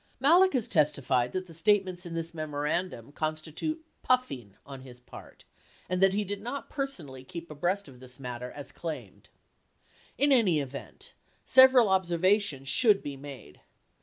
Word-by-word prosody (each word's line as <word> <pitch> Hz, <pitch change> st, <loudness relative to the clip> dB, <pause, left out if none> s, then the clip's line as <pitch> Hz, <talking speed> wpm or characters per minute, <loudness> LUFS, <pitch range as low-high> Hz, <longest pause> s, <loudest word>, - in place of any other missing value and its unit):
Malek 345 Hz, +8 st, +5 dB
has 250 Hz, -5 st, 0 dB
testified 140 Hz, -5 st, +1 dB
that 185 Hz, 0 st, -3 dB
the 170 Hz, -, -14 dB
statements 185 Hz, 0 st, +1 dB
in 165 Hz, -, -6 dB
this 165 Hz, 0 st, -4 dB
memorandum 150 Hz, -3 st, -3 dB
consti 155 Hz, +1 st, -4 dB
tute 315 Hz, -, -3 dB, 0.2 s
"puffing" 135 Hz, -, -1 dB
on 135 Hz, -2 st, -9 dB
his 125 Hz, -2 st, -13 dB
part 125 Hz, -, -14 dB, 0.4 s
and 180 Hz, 0 st, -1 dB
that 195 Hz, 0 st, +5 dB
he 210 Hz, +1 st, 0 dB
did 200 Hz, 0 st, -5 dB
not 245 Hz, +6 st, -6 dB
personally 170 Hz, -, -4 dB
keep 170 Hz, +3 st, -9 dB
abreast 175 Hz, +6 st, -1 dB
of 130 Hz, -3 st, -14 dB
this 125 Hz, 0 st, -8 dB
matter 125 Hz, -1 st, -6 dB
as 145 Hz, +2 st, -9 dB
claimed. 165 Hz, -3 st, -7 dB, 0.9 s
90 -, -, -1 dB
In 285 Hz, -, +4 dB
any 205 Hz, -, +4 dB
event, 140 Hz, -1 st, -8 dB, 0.3 s
several 260 Hz, -3 st, +7 dB
observations 185 Hz, -4 st, +1 dB
should 210 Hz, -, +4 dB
be 145 Hz, -1 st, -5 dB
made. 135 Hz, -, -11 dB
165 Hz, 160 wpm, -29 LUFS, 140-205 Hz, 0.9 s, several